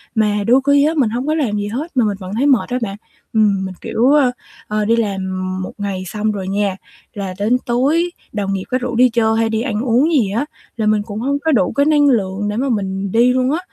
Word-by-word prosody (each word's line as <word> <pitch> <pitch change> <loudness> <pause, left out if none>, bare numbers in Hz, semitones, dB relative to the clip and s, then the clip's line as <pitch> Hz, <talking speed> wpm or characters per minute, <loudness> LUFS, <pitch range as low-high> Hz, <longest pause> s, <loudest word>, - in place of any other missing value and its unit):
Mà 210 -2 +1
đôi 255 +3 +5
khi 285 0 +5
á 315 - +1
mình 255 -7 +3
hông 245 +5 -3
có 305 - +2
làm 280 -9 0
gì 205 0 -2
hết 275 +8 -5
mà 245 - +4
mình 205 -2 -1
vẫn 185 0 -7
thấy 255 +5 +1
mệt 265 -5 +3
á 250 - -1
bạn. 200 -3 -4 0.4
Ừm, 205 -3 +2
mình, 185 -1 -6
kiểu, 240 +4 +1
ơ, 285 -4 +4 0.4
ờ, 210 0 -1
đi 230 +2 +3
làm 205 -4 -1 0.4
một - - -7
ngày 200 -2 -3
xong 215 +3 -2
rồi 195 -3 -5
nha, 200 0 0 0.4
là 195 -3 -5
đến 220 +5 +2
tối 290 +9 +1 0.2
đồng 200 -2 -2
nghiệp 190 -1 -2
có 255 - +1
rủ 250 -1 -4
đi 250 +2 +5
chơi 225 -1 +1
hay 225 0 +1
đi 220 0 -1
ăn 225 -4 -2
uống 255 +6 +2
gì 240 -11 +2
á 230 +8 -1 0.3
là 220 - -1
mình 215 0 +2
cũng 210 0 -6
hông 280 +4 -1
có 320 +2 0
đủ 200 -10 +2
cái 280 +1 +2
năng 295 -1 +4
lượng 205 -4 0
để 210 - -3
mà 270 +3 0
mình 195 -3 -2
đi 240 +3 +4
luôn 255 +1 +1
á, 315 - 0
225 Hz, 260 wpm, -18 LUFS, 205-260 Hz, 0.4 s, đôi